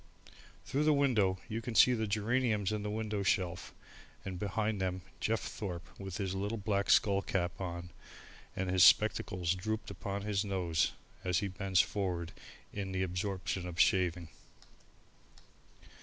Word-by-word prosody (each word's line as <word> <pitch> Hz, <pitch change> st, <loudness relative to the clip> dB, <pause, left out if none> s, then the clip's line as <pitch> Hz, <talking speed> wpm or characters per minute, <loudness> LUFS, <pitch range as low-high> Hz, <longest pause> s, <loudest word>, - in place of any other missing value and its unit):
Through 145 Hz, +3 st, 0 dB
the 155 Hz, -1 st, +5 dB
window 110 Hz, -10 st, +3 dB
you 115 Hz, 0 st, -3 dB
can 115 Hz, 0 st, -5 dB
see 125 Hz, -, +7 dB
the 110 Hz, -2 st, -1 dB
geraniums 110 Hz, -1 st, +1 dB
in 105 Hz, -1 st, -2 dB
the 105 Hz, -, -3 dB
window 105 Hz, -1 st, -2 dB
shelf 90 Hz, -2 st, 0 dB, 0.5 s
and 95 Hz, -2 st, -5 dB
behind 105 Hz, +1 st, -1 dB
them 95 Hz, -1 st, -2 dB, 0.2 s
Jeff 115 Hz, +1 st, 0 dB
Thorpe 90 Hz, -5 st, -5 dB
with 95 Hz, -3 st, -5 dB
his 95 Hz, -3 st, -2 dB
little 100 Hz, +4 st, -2 dB
black 100 Hz, -1 st, -1 dB
scull 100 Hz, -3 st, +4 dB
cap 90 Hz, -2 st, -2 dB
on 85 Hz, -1 st, -5 dB, 0.6 s
and 95 Hz, -, -2 dB
his 90 Hz, -1 st, +5 dB
spectacles 90 Hz, +1 st, +4 dB
drooped 110 Hz, +3 st, -3 dB
upon 100 Hz, 0 st, -4 dB
his 105 Hz, -1 st, 0 dB
nose 90 Hz, -5 st, 0 dB, 0.3 s
as 90 Hz, -2 st, +1 dB
he 100 Hz, -, 0 dB
bends 95 Hz, -1 st, +2 dB
forward 90 Hz, -4 st, -2 dB, 0.4 s
in 95 Hz, -2 st, -4 dB
the 95 Hz, 0 st, 0 dB
absorption 95 Hz, 0 st, -2 dB
of 85 Hz, -1 st, -7 dB
shaving. 90 Hz, -3 st, +2 dB
100 Hz, 150 wpm, -33 LUFS, 90-105 Hz, 0.6 s, see